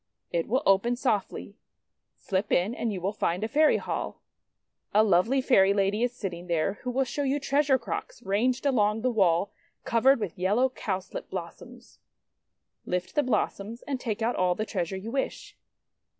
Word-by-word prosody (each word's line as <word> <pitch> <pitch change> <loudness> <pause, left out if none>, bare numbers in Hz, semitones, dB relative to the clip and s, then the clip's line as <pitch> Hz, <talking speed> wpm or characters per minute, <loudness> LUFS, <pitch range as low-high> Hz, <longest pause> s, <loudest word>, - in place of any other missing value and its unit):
It 170 -1 -1
will 260 +6 +1
open 195 +5 +3
softly. 215 -4 -2 0.6
Slip 195 +2 -2
in, 185 +6 +2
and 235 -2 -2
you 195 - -4
will 190 +3 -1
find 180 0 -1
a - - 0
Fairy 305 +5 +4
Hall. - - -4 0.8
A 215 - +7
lovely 220 +7 +3
Fairy 200 -7 +4
Lady 200 +2 +1
is 245 0 +1
sitting 180 -7 -6
there, 170 +4 0
who 250 - -4
will 260 +2 +1
show 260 +3 -4
you 280 +1 0
treasure 280 -1 +2
crocks 245 - -6
ranged 245 +7 0
along 220 -5 +2
the 255 - +2
wall 190 -4 +2 0.3
covered 250 +3 +4
with 195 -5 -5
yellow 210 +8 +2
Cowslip 190 -6 -5
blossoms. 170 -3 -9 0.8
Lift 180 0 -3
the 295 - +3
blossoms, 230 -3 -2
and 275 -2 -3
take 225 -2 -3
out 235 +2 +1
all 180 -1 +2
the 215 - -2
treasure 190 -2 -3
you 210 +4 -6
wrish. 270 +1 -3
215 Hz, 170 wpm, -27 LUFS, 190-250 Hz, 0.8 s, A